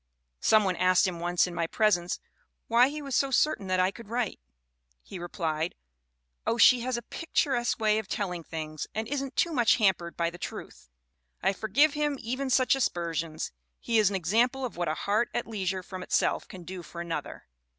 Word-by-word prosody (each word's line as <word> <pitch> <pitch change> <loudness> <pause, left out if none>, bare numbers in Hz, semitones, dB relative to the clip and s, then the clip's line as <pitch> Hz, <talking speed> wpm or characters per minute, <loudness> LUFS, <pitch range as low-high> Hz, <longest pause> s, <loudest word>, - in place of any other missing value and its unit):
"Some 215 -1 +4
one 185 -2 0
asked 185 +1 +4
him 175 -2 -4
once 175 +1 +2
in 180 - -6
my 170 -1 -1
presence 180 -4 +1 0.5
why 240 +3 +5
he 300 +1 -6
was 275 -2 -3
so 275 - +2
certain 270 -6 +1
that 185 0 +1
I 185 +1 +3
could 230 0 -12
write. 235 -2 -2 0.6
He 190 - -8
replied: 165 -1 -2 0.7
'Oh, 230 - +1
she 250 +1 +7
has 250 +1 -2
a 235 - -6
picturesque 255 -4 -1
way 215 -1 +3
of 220 - -6
telling 180 -5 -3
things 155 -1 -5
and 220 +1 -2
isn't 275 0 -3
too 340 -2 +1
much 240 -6 +4
hampered 190 -6 +1
by 170 0 0
the 175 - -11
truth.' 60 - -8 0.5
I 195 +2 +3
forgive 250 +10 +3
him 295 -1 0
even 255 +4 -3
such 255 +1 +4
aspersions. 165 - -2 0.3
He 230 -1 +1
is 210 -3 +4
an 200 - -3
example 240 +8 +1
of 245 - -6
what 175 -1 -2
'a 155 - 0
heart 210 +7 0
at - - 0
leisure 190 -4 -3
from 185 0 -8
itself - - 0
can 185 -2 -10
do 180 +1 -7
for 170 +1 -10
another. 170 -1 -5
200 Hz, 195 wpm, -28 LUFS, 175-245 Hz, 0.7 s, she